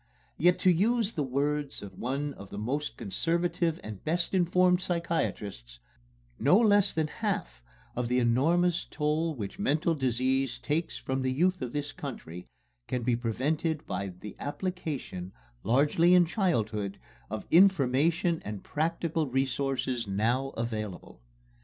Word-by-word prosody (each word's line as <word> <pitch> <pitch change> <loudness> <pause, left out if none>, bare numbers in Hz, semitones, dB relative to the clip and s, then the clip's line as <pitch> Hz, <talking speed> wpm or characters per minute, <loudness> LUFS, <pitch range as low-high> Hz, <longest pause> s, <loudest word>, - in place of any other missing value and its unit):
Yet, 175 +3 +5
to 185 - +6
use 220 +5 +2
the 155 - -2
words 145 +1 -1
of 100 - -10
one 140 +3 -2
of 100 -5 -12
our - - -6
most 135 +8 -2
conservative 170 - 0
and 105 -2 -8
best 170 +4 0
informed 180 0 +3
psychiatrists, 140 - -2 0.6
"No 185 - +5
less 205 -3 +5
than 160 -1 0
half 60 - -3 0.3
of 125 -1 -1
the 125 +1 +1
enormous 160 +9 +2
toll 155 +1 0
which 105 - -6
mental 165 -3 +2
disease 130 -1 0
takes 160 +3 -2
from 130 0 -2
the 130 0 0
youth 180 +7 +1
of 125 -2 -3
this 145 +1 -3
country 90 - -8 0.4
can 125 -1 -2
be 120 0 +2
prevented 145 +7 -1
by 100 +2 -3
the 95 +3 -9
application, 145 - -4 0.3
largely 150 +8 +4
in 180 -1 +6
childhood, 110 - -1 0.3
of - - -5
information 165 -1 +4
and 105 -2 -6
practical 165 0 -1
resources 135 -2 -1
now 115 +7 +1
available." 110 - -5
145 Hz, 135 wpm, -29 LUFS, 120-170 Hz, 0.6 s, to